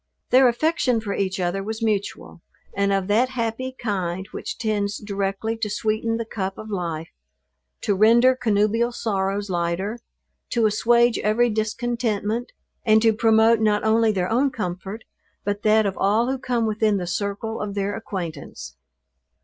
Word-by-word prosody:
Their 260 +1 +7
affection 250 -1 +1
for 210 -3 -4
each 190 -1 -2
other 180 +2 -1
was 220 +3 -5
mutual, 205 -5 -2 0.3
and 200 0 +1
of 195 -1 +1
that 235 +5 +3
happy 255 +1 -3
kind 190 -4 -3
which - - -6
tends 210 -3 -1
directly 200 +2 -2
to 220 -2 -2
sweeten 220 +2 -1
the 230 - -3
cup 195 -3 -4
of 215 0 -8
life; 165 -4 -3 0.7
to 205 - +1
render 235 +6 +5
connubial 225 0 +1
sorrows 200 -3 -2
lighter; 175 +6 -2 0.5
to 235 -2 +1
assuage 235 +3 +3
every 230 +3 +2
discontentment 225 0 -2 0.3
and 220 -2 +5
to 225 -1 +5
promote 225 +1 +4
not 210 -1 +2
only 220 0 +3
their 185 -3 -1
own 255 +6 +2
comfort, 200 -2 -5 0.4
but 205 0 -2
that 215 0 +4
of 195 -1 -2
all 220 +6 +2
who 265 - -3
come 245 -3 0
within 215 -1 +1
the 180 - -3
circle 200 +5 -3
of 205 -1 -4
their 200 0 -1
acquaintance. 170 - -7
215 Hz, 155 wpm, -23 LUFS, 200-230 Hz, 0.7 s, Their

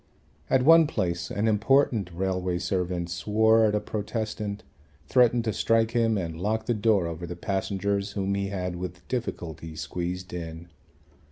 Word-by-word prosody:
At 130 -1 +3
one 165 0 +7
place 85 - -2
an 105 +2 -1
important 110 -2 +2
railway 90 0 -1
servant 90 -2 -2
swore 110 +5 +3
at 105 -1 +2
a - - +2
protestant, 105 0 -4 0.4
threatened 120 - +4
to 110 -2 -1
strike 115 +1 +2
him 115 -2 +2
and 85 -3 -4
locked 110 +3 -1
the 120 - +1
door 105 -4 +2
over 85 +1 -5
the 85 - -5
passengers 100 +2 -2
whom 100 -1 -1
he 100 0 -1
had 90 -2 -3
with 90 -1 -7
difficulty 80 - -4
squeezed 90 +4 -4
in. 85 0 -7
100 Hz, 155 wpm, -27 LUFS, 90-110 Hz, 0.4 s, one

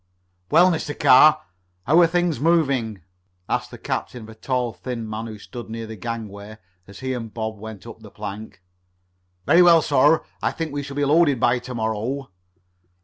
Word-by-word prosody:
"Well, 180 +2 +5
Mr. 155 -3 -4
Carr, 155 +4 +6 0.4
how 155 +6 +4
are 170 - +6
things 175 -4 0
moving?" 135 - +1 0.4
asked - - -2
the - - -10
captain 125 -3 -4
of 110 - -12
a - - -10
tall, 125 +1 -2
thin 120 -3 -6
man 110 +1 -5
who 110 -1 -8
stood 120 +2 -10
near 115 0 -6
the 110 0 -8
gangway 110 -1 -7 0.3
as 100 +3 -13
he 130 0 -2
and 115 -3 -6
Bob 110 0 -5
went 110 -3 -9
up - - -10
the - - -13
plank. 105 -2 -8 0.8
"Very 175 - +5
well, 170 -3 +6
sir. 150 +2 +3 0.2
I - - 0
think 160 -3 -5
we 145 - -2
shall 140 0 -8
be 145 0 0
loaded 145 -3 +3
by 120 +2 +2
to 125 +1 -8
morrow." 115 +4 -3
125 Hz, 185 wpm, -22 LUFS, 110-145 Hz, 0.8 s, Carr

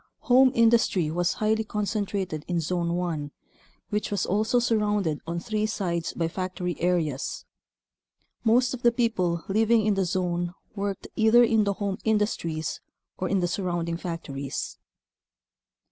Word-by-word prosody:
Home 260 0 +5
industry 225 -8 +3
was 175 +1 +1
highly 220 +1 +1
concentrated 200 -6 -2
in 175 -2 0
Zone 170 +1 -1
1 165 -5 -2 0.6
which 210 0 -1
was 200 -3 0
also 215 +5 +1
surrounded 210 -9 +1
on 170 +1 -2
three 215 +4 -1
sides 175 -6 -2
by 165 - -1
factory 180 0 -3
areas. 165 -6 -1 1.0
Most 245 +3 +3
of 250 - -6
the 240 - +5
people 190 -8 0
living 220 +2 +3
in 215 - +3
the 195 -1 +1
zone 175 -1 -1 0.2
worked 200 -1 -3
either 220 +2 +6
in 220 -2 +3
the 200 - +1
home 200 -1 -3
industries 205 -8 -1 0.4
or 185 - -1
in 195 -2 +2
the 175 - +1
surrounding 175 -2 -2
factories. 140 -6 -5
190 Hz, 140 wpm, -26 LUFS, 170-220 Hz, 1.0 s, either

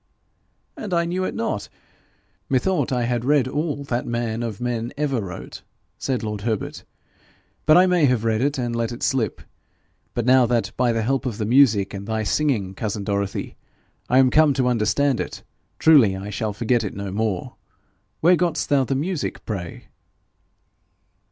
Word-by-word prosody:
'And 200 -5 -3
I 170 0 +2
knew 185 +2 -1
it - - -4
not! 225 - -3 0.8
Methought 140 +2 +1
I 125 -2 +1
had 120 0 -1
read 140 -1 +3
all 145 +1 -2
that 125 -3 -2
man 120 -1 -2
of 115 -4 -4
men 120 -1 -2
ever 140 -5 0
wrote,' 90 -3 -8 0.4
said 130 -3 -2
lord 105 -2 -4
Herbert. 110 -1 -3 0.8
'But 155 - +7
I 180 - +7
may 180 -4 +3
have 125 -4 +2
read 110 0 +1
it, 140 +2 0
and 120 -2 -2
let 115 0 -1
it 120 - -7
slip. 120 -7 0 0.7
But 120 - -1
now 130 -1 +5
that, 120 -1 0
by 125 -1 +2
the 115 -1 0
help 130 +2 0
of 115 -5 -4
the 110 - -2
music 110 -5 +4
and 100 0 -7
thy 110 -1 -1
singing, 110 -7 0
cousin 105 0 -3
Dorothy, 100 0 -3 0.5
I 125 - +4
am 130 -1 +5
come 155 -1 +4
to 130 -1 +1
understand 125 +3 +1
it, - - -5 0.3
truly 130 -12 +5
I 100 +2 -6
shall 110 0 -2
forget 115 +3 0
it 100 - -5
no 100 -1 -5
more. 105 -2 -2 0.6
Where 175 +3 +6
got'st 170 -1 -1
thou 140 -2 +4
the 135 +1 -1
music, 160 +3 -3
pray?' 90 -6 -5
120 Hz, 175 wpm, -22 LUFS, 110-140 Hz, 0.8 s, But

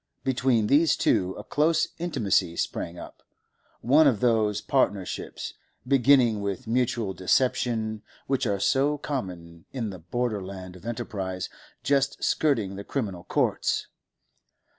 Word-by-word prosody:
Between 125 -4 +2
these 150 +7 +4
two 95 0 +1
a - - -7
close 155 +2 +2
intimacy 105 - 0
sprang 85 +1 -3
up, - - -10 0.6
one 145 +5 +5
of 120 -7 +2
those 110 -3 +2
partnerships, 100 -8 -1 0.3
beginning 130 -5 +4
with 100 -2 -3
mutual 115 -3 0
deception, 110 +2 0 0.2
which 135 -2 0
are 100 -2 0
so 140 +8 +2
common 90 - -6
in 115 -6 -3
the 95 - -9
border 105 +4 -2
land 95 -1 -8
of 90 +5 -11
enterprise 100 -6 -4 0.3
just 140 0 +1
skirting 110 -11 +1
the 100 - -6
criminal 100 -9 -4
courts. - - 0
115 Hz, 125 wpm, -26 LUFS, 95-135 Hz, 0.6 s, one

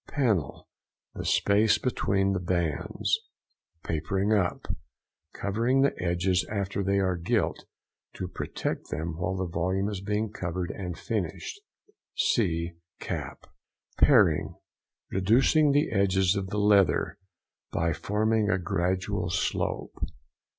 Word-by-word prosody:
PANEL.—The 110 - -3
space 105 +2 +3
between 100 -6 +1
the 95 - 0
bands. 85 -4 0 0.6
PAPERING 95 +6 0
UP.—Covering 105 - -2
the 140 - +3
edges 90 +1 +1
after 100 -1 -2
they 100 +1 +1
are 95 -2 +2
gilt, 85 0 -1 0.5
to 95 - -4
protect 90 - -4
them 80 +1 -3
while 90 +2 -1
the 95 - -1
volume 90 +3 -1
is 100 -3 -4
being 105 +1 -1
covered 90 -1 -3
and 90 -3 -5
finished 110 - -4 0.5
(see 85 -6 +1 0.3
CAP). - - -5 0.5
PARING.—Reducing 130 - +2
the 145 +2 +2
edges 95 -2 +3
of 100 -1 -2
the 105 - -3
leather 100 -3 +3 0.5
by 85 0 +1
forming 105 +5 +1
a 95 - +3
gradual 95 0 -1
slope. 85 - -1
95 Hz, 110 wpm, -28 LUFS, 90-105 Hz, 0.6 s, space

